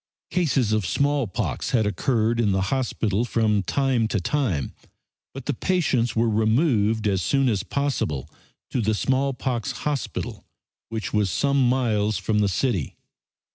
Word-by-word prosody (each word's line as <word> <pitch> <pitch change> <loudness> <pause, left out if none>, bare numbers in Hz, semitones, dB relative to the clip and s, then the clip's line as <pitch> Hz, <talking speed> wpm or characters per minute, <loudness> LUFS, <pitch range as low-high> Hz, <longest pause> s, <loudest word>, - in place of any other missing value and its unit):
Cases 135 - +1
of 110 -1 +1
smallpox 140 +2 -1
had 110 -4 +2
occurred 115 +3 +1
in 105 -4 +2
the 95 - +1
hospital 115 -5 0
from 110 -4 +1
time 130 0 +1
to 110 - -1
time, 95 - -1 0.6
but - - -9
the - - 0
patients 140 -10 0
were 115 +1 +2
removed 110 0 +2
as 95 -2 +1
soon 135 +7 +2
as 105 -6 +1
possible 115 - -2 0.4
to 125 - 0
the 110 0 +1
smallpox 130 -2 -1
hospital, 145 -4 -3 0.5
which 110 -1 -4
was 105 -2 +2
some 140 - +2
miles 110 -5 +1
from 105 -1 0
the 105 -1 +2
city. 95 - -1
115 Hz, 140 wpm, -24 LUFS, 105-135 Hz, 0.6 s, had